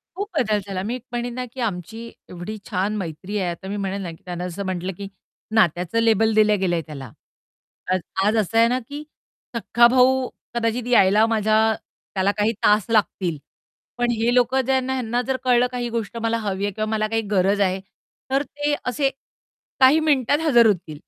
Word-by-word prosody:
खूप 405 +2 -3
बदल 215 -3 +2
झाला. 190 -1 -3
मी 235 +5 -3
म्हणेल 240 0 -3
ना, 250 +1 -4
की 260 - -10
आमची 220 +2 -4 0.2
एवढी 180 +5 -7
छान 200 +1 -1
मैत्री 185 +3 -5
आहे, 180 -3 -1
आता 170 +3 -8
मी 205 +1 -3
म्हणेल 195 0 -3
ना, 175 -3 -5
त्यांना 180 -1 -5
असं 180 +2 -5
म्हटलं, 185 0 -3
की 200 - -6 0.5
नात्याचं 180 +2 +2
लेबल 225 -1 +3
दिलं 210 -2 +4
गेलंय 175 -3 0
त्याला. 135 -6 -8 0.8
आज 185 - +2 0.3
आज 215 +2 +2
असं 215 +1 0
आहे 230 0 +6
ना, 250 +2 0
की 290 +1 -7 0.5
सख्खा 235 +1 +4
भाऊ 255 +1 +3 0.3
कदाचित 235 +1 -1
यायला 210 -2 +5
माझ्या 215 -1 +2 0.6
त्याला 190 +1 +2
काही 210 +2 +2
तास 210 -1 +4
लागतील, 190 -7 +1 0.6
पण 240 0 +1
हे 230 +1 +1
लोकं 250 +2 +3
ज्यांना 265 0 +1
ह्यांना 245 -1 -1
जर 265 -1 0
कळलं 250 -1 +3
काही 245 -1 -3
गोष्ट 230 0 -4
मला 230 0 +1
हवी 200 -2 -2
आहे 205 - -1
किंवा 215 +2 -2
मला 215 -1 0
काही 225 +1 0
गरज 195 +1 +2
आहे, 190 -1 +1 0.5
तर 275 +2 +2
ते 290 0 -2
असे 270 +2 +1 0.7
काही 270 +4 +6
मिनिटात 290 -2 +2
हजर 240 -6 +6
होतील. 170 -7 -2
220 Hz, 180 wpm, -22 LUFS, 195-245 Hz, 0.8 s, आहे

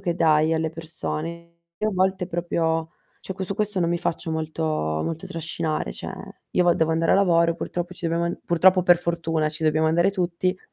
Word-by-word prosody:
che 175 -4 -1
dai 160 -1 +3
alle 160 -1 0
persone. 165 +1 -6 0.2
Io 215 +3 0
a - - -6
volte 185 0 +1
proprio 165 -2 -1 0.3
cioè 190 - -6
que 190 - -4
su 195 - -3
questo 210 -1 -1
non 170 -1 +1
mi 175 - 0
faccio 165 0 -2
molto 160 0 -3
molto 155 - -2
trascinare. 160 - -3
Cioè, - - -7 0.4
io 180 - +2
vo 175 - +5
devo 160 0 +1
andare 165 0 +2
a - - +6
lavoro, 170 -4 +4
purtroppo 175 +1 -4
ci 175 -1 -5
dobbiamo 170 +1 0
an 170 - -2
purtroppo 185 +2 +4
o - - +3
per 175 0 +6
fortuna, 165 -2 -1
ci 155 +1 -7
dobbiamo 155 +1 +3
andare 170 +4 +3
tutti, 185 0 -1
170 Hz, 205 wpm, -24 LUFS, 160-180 Hz, 0.4 s, a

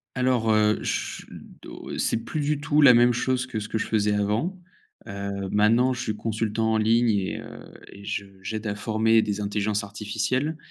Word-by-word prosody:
Alors, 125 -3 +1
heu, 105 0 +2
ch - - -3
do - - -10
c'est - - +1
plus 155 - -3
du 145 0 -1
tout 145 +1 +2
la 130 -3 +9
même 120 +1 +5
chose 130 +2 -1
que 120 -4 -4
ce 105 - -6
que 110 - -2
je - - -2
faisais 105 -1 +1
avant, 105 - -1 0.5
heu, 100 0 -5
maintenant 115 +5 +3
je 120 - -5
suis 110 - -3
consultant 110 0 -1
en - - +2
ligne 115 +2 +3
et 100 -3 -1
heu - - -11 0.3
et 100 - -12
je 100 0 -3 0.2
j'aide 110 +3 -5
à 100 - -1
former 110 +1 +2
des 105 -1 -2
intelligences 105 +1 -1
artificielles 110 +8 -2
110 Hz, 190 wpm, -25 LUFS, 105-120 Hz, 0.5 s, la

